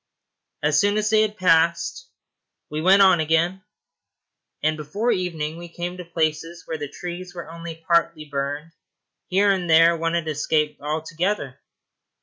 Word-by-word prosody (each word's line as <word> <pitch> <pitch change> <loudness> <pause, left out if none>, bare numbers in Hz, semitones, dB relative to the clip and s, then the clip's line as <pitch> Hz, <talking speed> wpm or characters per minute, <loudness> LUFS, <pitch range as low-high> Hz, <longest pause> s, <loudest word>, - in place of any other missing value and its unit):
As 150 0 +3
soon 205 +3 +2
as 215 0 0
they 215 -1 +5
had 215 -1 -1
passed, 170 - +2 0.6
we 155 +1 -2
went 195 +4 +6
on 185 -3 +5
again, 165 +4 +1 1.0
and 155 +1 +2
before 175 +11 -2
evening 165 -4 -2
we 170 0 -9
came 175 +2 -5
to 180 - -6
places 165 0 -2
where 160 - -5
the 145 -1 -5
trees 175 +4 -7
were 170 - -7
only 165 0 -7
partly 165 -1 0
burned; 145 +2 -4 0.6
here 200 +2 +3
and 180 -3 -1
there 165 +1 +6
one 165 0 -1
had 170 -1 -1
escaped 150 0 0
altogether. 155 0 -2
165 Hz, 150 wpm, -23 LUFS, 155-180 Hz, 1.0 s, went